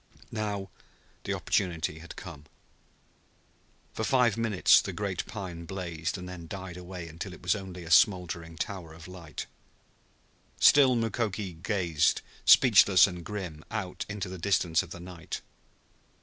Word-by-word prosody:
Now 105 -3 -3 0.5
the - - -1
opportunity 85 -4 -1
had 85 +1 -10
come. 80 -6 -10 1.5
For 110 - -3
five 120 -2 +3
minutes 115 -5 +4
the - - -5
great - - -3
pine 85 -4 -6
blazed, 85 -2 -4
and 90 0 -8
then 90 -2 -8
died 95 -1 -7
away 90 -1 -8
until 85 +3 -7
it - - -18
was 90 - +3
only 95 -3 -7
a 80 - -8
smoldering 85 -2 +3
tower 90 -5 -5
of 80 +1 -12
light. 90 -4 -8 1.1
Still 135 -3 +7
Mukoki 110 -4 -2
gazed, 90 -7 +1 0.2
speechless 105 -7 +7
and 90 -3 -5
grim, 90 -6 -6
out 100 -5 -4
into 105 -2 -4
the 95 0 -7
distance 85 -3 +2
of - - -10
the - - -8
night. 90 0 -7
90 Hz, 140 wpm, -29 LUFS, 85-100 Hz, 1.5 s, Still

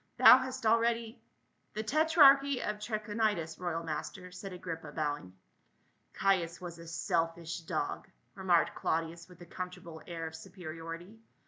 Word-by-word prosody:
"Thou 255 - +10
hast 260 -1 -5
already 230 +1 +2 0.2
— - - -44
?" - - -44
"The 215 - -2
tetrarchy 280 0 +5
of 210 0 -3
Trachonitis, 210 -6 -1
royal 170 -2 -2
master," 180 +3 -5
said 190 +2 -8
Agrippa 165 -4 -6
bowing. 145 - -2 0.4
" - - -41
Caius 180 -3 +2
was 175 -2 -8
a 165 - -10
selfish 165 +1 -1
dog," 165 - -3 0.3
remarked 185 -4 +2
Claudius 165 +2 -2
with 180 - -15
a - - -9
comfortable 170 -2 -7
air 165 -2 -5
of 160 0 -6
superiority. 170 +2 -8
180 Hz, 145 wpm, -32 LUFS, 165-215 Hz, 0.4 s, Thou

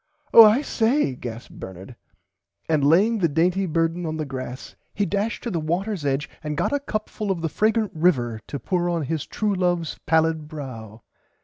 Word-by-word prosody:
Oh 230 - +12
I 220 +6 +5
say 235 - +1
gasped 120 -1 -8
Bernard 95 +5 -9 0.7
and 155 -3 +1
laying 200 +10 +4
the 175 - +3
dainty 175 +5 +1
burden 165 +1 0
on 155 0 -3
the 155 - -2
grass 130 -1 -7 0.2
he 205 - +1
dashed 205 +3 -2
to 235 - -3
the 170 - -1
waters 175 +3 -2
edge 140 +2 0 0.2
and 150 -1 -3
got - - 0
a 285 - +2
cup 215 -6 -3
full 210 -2 -5
of 185 -4 -1
the 165 - 0
fragrant 220 +3 +1
river 130 -9 +1
to 140 - -4
pour 175 +6 -1
on 170 -2 -1
his 155 +1 -3
true 210 -1 -1
loves 175 -3 -1
pallid 160 -1 +2
brow. 120 -8 -8
165 Hz, 190 wpm, -23 LUFS, 145-200 Hz, 0.7 s, Oh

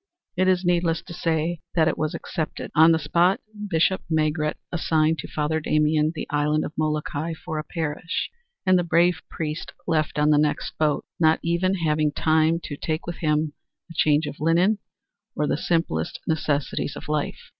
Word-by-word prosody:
It 185 +1 +2
is 185 -1 +2
needless 170 -2 +1
to 180 -1 -9
say 165 0 -1 0.2
that 160 -2 +4
it 160 - +1
was 155 -1 -2
accepted. 160 -2 -4
On 160 +2 +7
the 165 - +4
spot 170 +6 +2 0.3
Bishop 175 +1 +2
Maigret 155 -1 +1 0.2
assigned 160 -2 +1
to - - -5
Father 155 +1 -1
Damien 155 0 +2
the - - -4
island 150 +1 +1
of - - -6
Molokai 155 +1 -1
for 160 -2 -5
a - - -3
parish, 160 +1 -3 0.3
and 185 -1 +5
the - - +1
brave 170 +1 +3
priest 155 0 -4
left 155 -3 0
on 150 +1 +4
the 150 - +5
next 150 0 0
boat, 150 -2 +1
not 160 -1 +4
even 170 +3 +1
having 155 -3 +1
time 160 +2 +2
to 145 - -5
take 155 +1 -3
with 170 -1 -5
him 150 -1 0 0.4
a - - -8
change 150 -1 +3
of 145 - -7
linen 175 +7 +3 0.6
or 150 - 0
the - - +1
simplest 150 - -1
necessities 145 -3 -1
of - - -9
life. 150 -1 -1
160 Hz, 175 wpm, -24 LUFS, 150-170 Hz, 0.6 s, On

